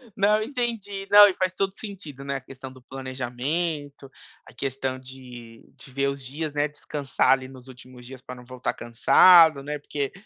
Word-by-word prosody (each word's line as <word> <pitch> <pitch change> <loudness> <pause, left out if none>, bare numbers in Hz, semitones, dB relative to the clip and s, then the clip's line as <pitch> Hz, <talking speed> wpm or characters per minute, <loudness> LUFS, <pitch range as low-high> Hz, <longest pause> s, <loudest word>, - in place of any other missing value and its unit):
Não, 210 +2 +2
entendi. 220 -6 -4
Não, 205 0 +9
e 195 - 0
faz 185 0 -1
todo 195 0 -2
sentido, 180 -10 -9
né, 140 0 -4
a 135 - -4
questão 130 0 -11
do 130 -1 -16
planejamento, 135 +3 -4 0.4
a - - -15
questão 130 -1 -4
de 125 -3 -12
de 135 - -16
ver 140 +1 0
os 140 -1 -6
dias, 150 +3 -5
né, 145 +1 0
descansar 145 -2 -1
ali 130 -1 +1
nos 130 -1 -14
últimos 125 -1 -14
dias 130 0 -11
pra 125 -1 -9
não 125 0 -14
voltar 130 0 -4
cansado, 155 +6 +5
né, 150 +1 -5
porque 140 -1 -4
140 Hz, 180 wpm, -24 LUFS, 130-170 Hz, 0.4 s, Não